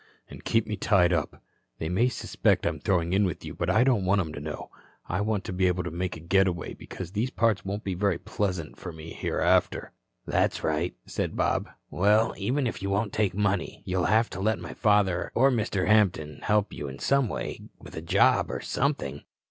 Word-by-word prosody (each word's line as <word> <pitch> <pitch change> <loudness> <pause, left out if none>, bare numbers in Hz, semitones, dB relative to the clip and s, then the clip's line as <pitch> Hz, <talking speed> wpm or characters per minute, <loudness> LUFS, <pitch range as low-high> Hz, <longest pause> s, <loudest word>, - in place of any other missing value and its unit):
"And - - -11
keep 115 -1 +2
me 105 - -3
tied 90 -3 +3
up. 80 -5 -2 0.3
They 80 - -3
may 110 +9 +2
suspect 125 - 0
I'm - - -1
throwing 90 -2 +1
in 100 +2 +4
with 90 -5 -2
you, - - -6
but - - -2
I 110 - +4
don't 125 -7 +2
want 95 +2 +3
'em 80 -5 -2
to 75 - -6
know. 75 +1 -6 0.4
I 90 +3 -1
want 105 -2 0
to - - -5
be 95 0 +2
able 90 0 0
to 90 - -4
make 90 0 -3
a - - -10
getaway, 90 +1 +1
because 90 -2 -8
these 110 +5 -1
parts 115 -5 +1
won't 100 +2 -4
be 95 - -2
very 95 -1 +1
pleasant 90 -4 -3
for 90 - -6
me 80 0 -9
hereafter." - - +1 0.3
"That's - - 0
right," 80 -1 0
said - - -3
Bob. - - 0 0.2
"Well, 105 +4 +3
even 130 +8 -1
if 115 - -3
you 100 - -2
won't 100 +1 0
take 105 -4 +1
money, 100 -3 -1
you'll 90 -1 0
have 110 +2 +3
to 90 - -6
let 110 +1 +1
my 85 - -8
father 100 -4 +2
or 135 +3 +5
Mr. 105 -5 0
Hampton 90 -9 +2
help 105 0 +1
you 75 - -5
in 70 0 -7
some 140 - +2
way, - - -4 0.2
with - - -12
a 80 - -4
job 80 - +3
or - - -3
something." 125 - -2
95 Hz, 210 wpm, -27 LUFS, 85-105 Hz, 0.4 s, or